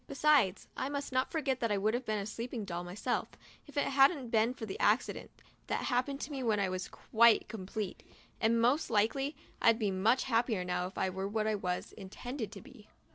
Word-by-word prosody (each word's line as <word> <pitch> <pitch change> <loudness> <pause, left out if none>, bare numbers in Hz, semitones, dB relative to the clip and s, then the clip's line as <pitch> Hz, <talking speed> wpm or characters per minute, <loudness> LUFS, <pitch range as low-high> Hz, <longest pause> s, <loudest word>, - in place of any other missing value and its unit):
Besides, 280 -9 +3
I 265 - -2
must 285 -1 -4
not 255 +1 0
forget 275 -5 0
that 230 -2 0
I 205 - +2
would 210 +3 +1
have 245 +1 -2
been 215 -1 0
a 200 - -3
sleeping 230 +1 -5
doll 175 -2 -4
myself, 180 +3 -2 0.4
if 290 - -12
it 285 - +3
hadn't 270 -1 +3
been 230 +3 +2
for 230 - -6
the 195 - -6
accident 215 +4 +1 0.4
that - - -1
happened 275 +3 0
to 295 - -5
me 275 -2 -4
when 220 -4 +1
I 195 -1 +1
wasn't 185 0 -4
quite 235 0 +4
complete 210 -1 -5 0.2
— - - -31
and, 230 +1 +3
most 250 +7 +2
likely, 260 +7 +1 0.3
I'd 230 -1 +5
be 210 -4 0
much 220 +7 +2
happier 230 -6 +1
now 180 0 -1
if 190 - -12
I 190 - 0
were 190 +1 -3
what 215 +1 -1
I 220 - +1
was 180 -3 -3
intended 220 +3 -6
to 200 - -9
be. 210 +3 -15
225 Hz, 220 wpm, -32 LUFS, 200-260 Hz, 0.4 s, I'd